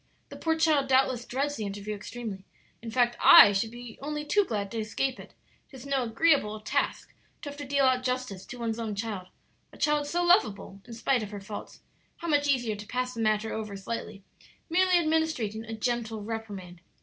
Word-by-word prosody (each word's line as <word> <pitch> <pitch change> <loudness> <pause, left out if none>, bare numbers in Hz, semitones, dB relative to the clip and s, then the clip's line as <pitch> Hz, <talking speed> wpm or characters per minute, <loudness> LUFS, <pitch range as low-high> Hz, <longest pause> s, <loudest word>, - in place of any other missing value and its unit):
The - - -9
poor 320 -1 0
child 310 -4 +3
doubtless 260 -2 +2
dreads 285 +3 -2
the 215 - -3
interview 205 +1 -5
extremely; 210 -1 -7 0.4
in 230 - -7
fact, 240 0 +2
I 205 - +10
should 200 +3 0
be 240 -1 -10
only 300 +1 -4
too 410 +7 +3
glad 205 - -3
to 230 - -3
escape 255 +5 -2
it; - - -13 0.3
'tis 265 -1 -11
no 275 -1 0
agreeable 225 -3 +2
task 215 - -2 0.3
to 290 - -4
have 285 - -10
to 290 - -5
deal 275 0 +2
out 255 -1 +3
justice 255 -7 -3
to 245 - -8
one's 230 -1 -3
own 220 -3 -3
child 200 -3 -4 0.4
a - - -15
child 295 -1 +1
so 350 +4 0
lovable, 210 - +2
in 235 - -9
spite 245 +2 +1
of 210 - -5
her 205 -1 -7
faults. 205 +1 -9 0.4
How 340 - -6
much 290 -1 +3
easier 240 -6 +1
to 205 0 -9
pass 250 +1 -2
the 230 - -4
matter 215 0 +1
over 215 -2 -5
slightly, 200 0 -6 0.5
merely 365 +1 +4
administering 310 -10 0
a 225 0 -5
gentle 225 -1 -2
reprimand! 205 -6 -6
235 Hz, 195 wpm, -28 LUFS, 215-280 Hz, 0.5 s, I